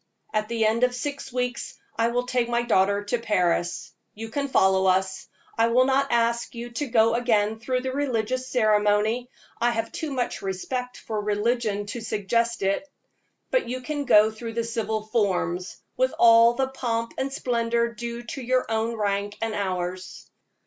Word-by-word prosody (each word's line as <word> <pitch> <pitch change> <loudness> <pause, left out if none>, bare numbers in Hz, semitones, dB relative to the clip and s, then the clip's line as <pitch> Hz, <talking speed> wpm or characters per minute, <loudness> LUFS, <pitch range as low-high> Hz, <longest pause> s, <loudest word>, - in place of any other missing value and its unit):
At 215 0 0
the 230 -1 +1
end 225 +3 +2
of 250 0 +3
six 275 +1 -5
weeks 250 0 -3 0.2
I 230 0 +2
will 245 +1 0
take 245 -1 0
my 240 0 +1
daughter 200 -3 +2
to 215 +4 -1
Paris, 180 -6 0 0.2
you 225 +1 -7
can 280 +4 -2
follow 190 -6 +3
us. 190 0 +1 0.3
I 230 - +5
will 250 +2 +4
not 270 +1 +1
ask 235 0 +1
you 240 +1 -6
to 280 +5 -3
go 225 -2 +4
again 220 -3 +1
through 255 +3 -1
the 260 0 -3
religious 255 -2 -1
ceremony 215 0 +2 0.3
I 240 - +3
have 225 -1 -2
too 315 - -4
much 255 -3 -2
respect 245 +7 -4
for 215 -2 -4
religion 210 0 0
to 210 +3 -6
suggest 230 +2 -1
it; 200 +10 0 0.6
but - - +1
you 255 +1 -3
can 290 +2 -3
go 215 -3 +6
through 225 +1 -7
the 230 0 -1
civil 225 -2 -2
forms, 185 -5 -1 0.2
with - - +1
all 230 0 +7
the 265 0 0
pomp 230 -3 -2
and 270 +1 -1
splendor 235 -2 0
due 235 +1 -6
to 250 +3 -6
your 255 +1 +1
own 225 +1 0
rank 205 -1 -1
and 225 -1 -2
ours. 185 -2 -4
230 Hz, 175 wpm, -25 LUFS, 210-245 Hz, 0.6 s, all